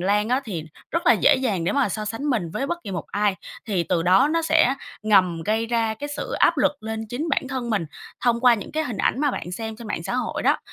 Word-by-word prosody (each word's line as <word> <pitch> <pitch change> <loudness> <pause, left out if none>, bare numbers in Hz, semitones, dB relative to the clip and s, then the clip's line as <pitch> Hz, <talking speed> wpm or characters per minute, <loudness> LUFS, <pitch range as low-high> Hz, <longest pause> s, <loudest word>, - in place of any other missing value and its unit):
lan 205 +4 +1
á, 255 +2 +2
thì 175 -9 -5 0.3
rất 335 +1 -2
là 245 - +8
dễ 220 - +4
dàng 210 -10 -1
để - - +1
mà 280 -4 +2
so 215 +2 -3
sánh 225 +6 -4
mình 190 -10 -1
với 270 +11 -2
bất 345 +2 -2
kỳ 200 - -5
một 175 -4 -4
ai. 205 -1 0 0.3
Thì 195 -6 0
từ 170 -1 0
đó 190 - +5
nó 330 0 +1
sẽ 320 -4 +4 0.3
ngầm 185 -6 +3
gây 220 +4 0
ra 230 -1 0
cái 290 +7 -6
sự 290 - -5
áp 335 - +3
lực 285 0 +1
lên 220 0 -4
chính 290 +8 -3
bản 270 -2 0
thân 255 -3 -3
mình, 200 -6 0 0.4
thông 235 -1 +2
qua 245 -2 +6
những 210 - -7
cái 315 +1 0
hình 235 -7 -5
ảnh 260 - +1
mà 290 - +2
bạn 180 -7 -5
xem 220 +2 -5
trên 235 - -10
mạng 165 - -3
xã 240 - -3
hội 250 -2 -2
đó. - - +3
225 Hz, 270 wpm, -23 LUFS, 200-265 Hz, 0.4 s, là